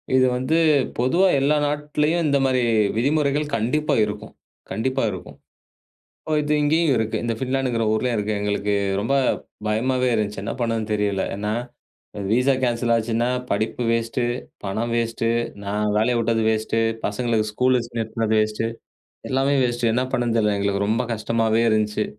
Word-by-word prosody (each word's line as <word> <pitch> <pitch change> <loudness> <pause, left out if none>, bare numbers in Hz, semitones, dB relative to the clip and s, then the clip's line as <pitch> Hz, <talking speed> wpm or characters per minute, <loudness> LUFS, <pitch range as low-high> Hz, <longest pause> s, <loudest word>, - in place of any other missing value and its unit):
இது 130 0 +5
வந்து 130 +6 0 0.4
பொதுவா 170 +10 +3
எல்லா 145 +3 +2
நாட்டுலயும் 150 +3 0
இந்த 140 -1 +3
மாதிரி 130 -1 +2 0.3
விதிமுறைகள் 145 +4 +1
கண்டிப்பா 130 +8 0
இருக்கும், 105 0 -7 0.4
கண்டிப்பா 130 +7 -1
இருக்கும். 95 - -9 0.9
ஓ. - - -1
இது 150 +1 0
இங்கயும் 155 0 +3
இருக்கு. 110 0 -1
இந்த 115 - -1
பின்லேண்ட்ங்கிற 130 -3 0
ஊர்லயும் 120 +2 0
இருக்கு. 105 +1 -1
எங்களுக்கு 105 0 0 0.3
ரொம்ப 135 +6 0 0.5
பயமாவே 125 +4 +1
இருந்துச்சு. 105 -2 -1
என்ன - - -3
பண்ணணும்னு 115 -2 -1
தெரியல. 100 -2 0
ஏன்னா 105 +1 -2 0.8
விசா 125 +4 +3
கேன்சல் 120 -1 +1
ஆச்சுன்னா, 115 +1 0 0.2
படிப்பு 110 +4 -1
வேஸ்ட். 115 +2 -1 0.4
பணம் 110 +4 -2
வேஸ்ட். 115 0 -1 0.4
நான் 105 +1 -1
வேலையை 120 +3 +2
விட்டது 115 -1 +1
வேஸ்ட். 110 0 -1 0.3
பசங்களுக்கு 110 0 0
ஸ்கூல் 125 +3 +2 0.2
நிறுத்துனது 110 0 -1
வேஸ்ட். 110 +1 -1 0.7
எல்லாமே 135 +2 +1
வேஸ்ட். 120 -1 -1
என்ன 125 +2 +1
பண்ணணும்னு 120 -3 0
தெரியல. 105 -2 +2
எங்களுக்கு 100 0 0
ரொம்ப 115 +3 +1
கஷ்டமாவே 115 +1 +1
இருந்துச்சு. 105 -1 +1
115 Hz, 140 wpm, -22 LUFS, 110-130 Hz, 0.9 s, இது